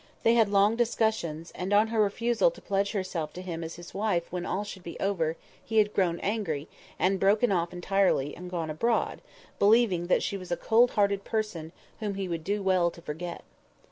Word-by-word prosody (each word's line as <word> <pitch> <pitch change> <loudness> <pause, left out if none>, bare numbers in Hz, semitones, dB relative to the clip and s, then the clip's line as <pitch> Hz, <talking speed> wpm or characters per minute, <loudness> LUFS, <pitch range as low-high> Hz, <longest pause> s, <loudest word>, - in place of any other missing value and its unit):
They 230 - +5
had 230 -2 +4
had - - -7
long 205 +2 +4
discussions; 220 -9 0
and 185 +2 -4
on 215 +2 +4
her 225 -1 +2
refusal 235 - +2
to - - -13
pledge 200 +1 -1
herself 185 -6 -3
to 180 - -7
him 170 -2 -5
as 165 +1 -6
his 175 0 -11
wife 190 -4 -1
when 180 0 -3
all 200 - -1
should 200 -2 -8
be 170 -1 -8
over, 165 -5 0 0.3
he 225 - -2
had 210 -1 +4
grown 175 -3 +1
angry, 195 -9 -2 0.3
and 190 +1 +1
broken 210 +4 +3
off 170 -2 0
entirely, 180 -5 +1
and 180 +1 -8
gone 165 -3 -3
abroad, 230 +9 0 0.4
believing 200 -5 +4
that - - +2
she 200 - -2
was 185 -2 -10
a 175 - +1
cold 235 +2 +4
hearted 200 -1 +2
person 210 -9 -3 0.3
whom 205 -2 -3
he 195 -1 -3
would 165 -2 -4
do 205 +3 -1
well 185 -2 +3
to 170 - -13
forget. 165 +4 -6
195 Hz, 205 wpm, -28 LUFS, 170-210 Hz, 0.4 s, They